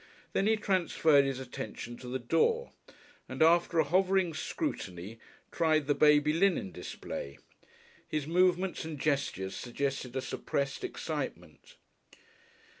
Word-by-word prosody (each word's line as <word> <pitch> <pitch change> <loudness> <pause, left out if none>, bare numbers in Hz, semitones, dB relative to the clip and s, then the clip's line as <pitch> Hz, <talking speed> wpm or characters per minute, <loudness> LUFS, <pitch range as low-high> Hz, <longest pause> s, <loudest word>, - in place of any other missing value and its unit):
Then 195 - +2
he 220 - +4
transferred 170 -8 +3
his 135 -1 -2
attention 120 -2 -7
to 125 - -10
the 125 +1 -2
door, 165 - +1 0.6
and - - +1
after 170 +1 +4
a 160 - +6
hovering 185 +2 +2
scrutiny, 115 - -4 0.3
tried 155 -2 +2
the 145 - +2
baby 150 0 +4
linen 170 - +2
display. 70 -4 -7 0.7
His 155 -2 -2
movements 180 +2 +2
and 160 -3 -6
gestures 130 -10 -1
suggested 130 0 -3
a 130 - 0
suppressed 140 -1 -3
excitement. 440 +5 -5
155 Hz, 120 wpm, -31 LUFS, 130-180 Hz, 0.7 s, a